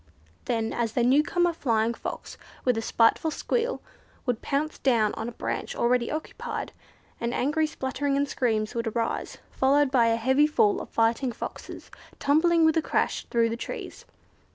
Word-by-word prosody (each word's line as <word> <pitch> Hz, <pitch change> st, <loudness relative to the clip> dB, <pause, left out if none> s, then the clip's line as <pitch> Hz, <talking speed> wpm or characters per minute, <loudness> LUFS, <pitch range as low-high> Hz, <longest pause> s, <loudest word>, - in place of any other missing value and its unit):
Then 225 Hz, -2 st, -1 dB, 0.2 s
the 245 Hz, -, +2 dB
new 260 Hz, +5 st, +5 dB
comer 350 Hz, +2 st, +1 dB
Flying 230 Hz, -6 st, +1 dB
Fox, -, -, -7 dB, 0.3 s
with 250 Hz, -2 st, +3 dB
a 225 Hz, -, -1 dB
spiteful 230 Hz, +7 st, +2 dB
squeal, 475 Hz, +9 st, -2 dB, 0.4 s
would 245 Hz, -4 st, -1 dB
pounce 300 Hz, +2 st, -2 dB
down 230 Hz, -6 st, +2 dB
on 220 Hz, +2 st, -4 dB
a -, -, -7 dB
branch -, -, -4 dB
already 240 Hz, 0 st, +1 dB
occupied, 310 Hz, +1 st, -5 dB, 0.5 s
and 235 Hz, +1 st, -2 dB
angry 300 Hz, +4 st, +1 dB
spluttering 275 Hz, 0 st, -2 dB
and 285 Hz, 0 st, +1 dB
screams 220 Hz, -5 st, -1 dB
would 230 Hz, -1 st, -2 dB
arise, 230 Hz, +1 st, -2 dB
followed 275 Hz, +1 st, +3 dB
by 240 Hz, -4 st, +4 dB
a 230 Hz, -, +3 dB
heavy 265 Hz, +6 st, +3 dB
fall 215 Hz, -9 st, +2 dB
of -, -, -9 dB
fighting 230 Hz, +3 st, +1 dB
Foxes 230 Hz, -, -8 dB, 0.3 s
tumbling 320 Hz, +4 st, +3 dB
with 320 Hz, -, +4 dB
a -, -, +3 dB
crash -, -, -1 dB
through 230 Hz, -1 st, +2 dB
the 225 Hz, -, -2 dB
trees. -, -, -7 dB
250 Hz, 165 wpm, -26 LUFS, 230-295 Hz, 0.5 s, new